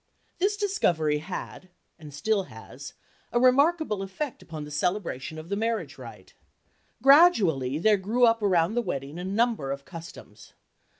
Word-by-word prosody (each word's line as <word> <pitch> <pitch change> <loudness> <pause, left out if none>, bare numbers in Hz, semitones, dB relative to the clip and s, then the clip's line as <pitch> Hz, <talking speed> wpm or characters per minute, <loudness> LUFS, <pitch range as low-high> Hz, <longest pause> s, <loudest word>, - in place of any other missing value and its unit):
This 405 +3 +1
discovery 165 - +1
had—and 175 -2 -10
still 195 +7 -1
has—a 140 - -8
remarkable 275 - +3
effect 220 +8 -5
upon 155 -2 -8
the 150 - -9
celebration 160 -3 -2
of 155 +2 -9
the 200 - -1
marriage 210 -10 -3
rite. 110 -7 -12 0.7
Gradually 205 - +5
there 210 +5 +3
grew 220 +6 +2
up 230 -1 +2
around 180 -2 +2
the 240 - +1
wedding 145 - -5
a - - -5
number 205 - 0
of 140 0 -6
customs. 165 -2 -12
185 Hz, 135 wpm, -26 LUFS, 150-230 Hz, 0.7 s, Gradually